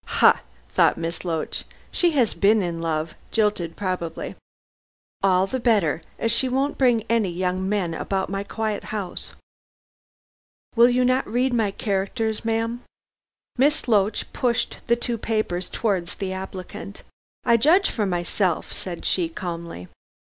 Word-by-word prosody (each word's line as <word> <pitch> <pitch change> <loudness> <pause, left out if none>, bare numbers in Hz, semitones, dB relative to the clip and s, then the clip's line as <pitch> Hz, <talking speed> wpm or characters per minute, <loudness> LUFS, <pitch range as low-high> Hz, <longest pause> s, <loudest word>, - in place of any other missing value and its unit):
"Ha!" - - +6 0.3
thought - - +3
Miss 165 +1 -3
Loach, 165 -3 -2 0.3
"she 350 - +3
has 250 -7 +3
been 210 +1 +4
in 170 -2 -3
love 160 -1 -1 0.2
jilted 210 -7 0
probably. 180 -4 -3 0.9
All 185 -1 +4
the 260 +6 -3
better, 205 - +2 0.2
as 230 - +1
she 255 +3 +3
won't 270 +3 0
bring 245 -4 +4
any 230 -4 +2
young 185 +2 -1
men 195 -5 0
about 190 +3 -1
my 195 +1 -3
quiet 215 0 -3
house." 205 -4 -5 1.4
"Will 235 +1 +7
you 250 +1 +3
not 255 +1 +2
read 250 +3 +1
my 225 -4 +2
characters, 210 +3 -2
ma'am?" 230 +1 -1 0.8
Miss 290 +1 +3
Loach 210 -2 +1
pushed 240 -2 0
the 235 - +4
two 235 -1 -2
papers 205 -6 0
towards 190 -6 -1
the 190 -2 -3
applicant. 190 +1 -7 0.4
"I 235 -1 +5
judge 330 - +5
for 210 -3 0
myself," 175 0 -1
said 175 -3 -6
she 175 -3 +1
calmly. 170 - -6
205 Hz, 140 wpm, -24 LUFS, 180-230 Hz, 1.4 s, Will